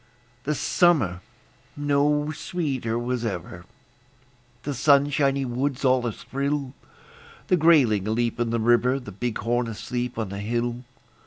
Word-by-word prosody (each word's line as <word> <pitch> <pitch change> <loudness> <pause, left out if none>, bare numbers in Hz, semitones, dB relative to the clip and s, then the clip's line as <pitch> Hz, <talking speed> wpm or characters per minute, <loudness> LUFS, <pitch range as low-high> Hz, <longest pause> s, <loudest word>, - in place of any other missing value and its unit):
The 150 +2 0
summer 135 - +2 0.6
no 145 +1 +1
sweeter 140 -8 -3
was 120 0 -2
ever; 90 -4 -5 1.0
The 145 - -3
sunshiny 140 0 +3
woods 130 +2 -2
all 130 -1 +3
athrill; 140 +4 -3 0.8
The 180 - +4
grayling 135 - +4
aleap 115 +2 -1
in 120 -1 0
the 115 0 0
river, 120 +3 +3
The 125 -6 -9
bighorn 120 +3 -1
asleep 120 +2 -4
on 110 -4 -2
the 100 +1 -5
hill. 120 +3 -2
125 Hz, 120 wpm, -25 LUFS, 115-140 Hz, 1.0 s, The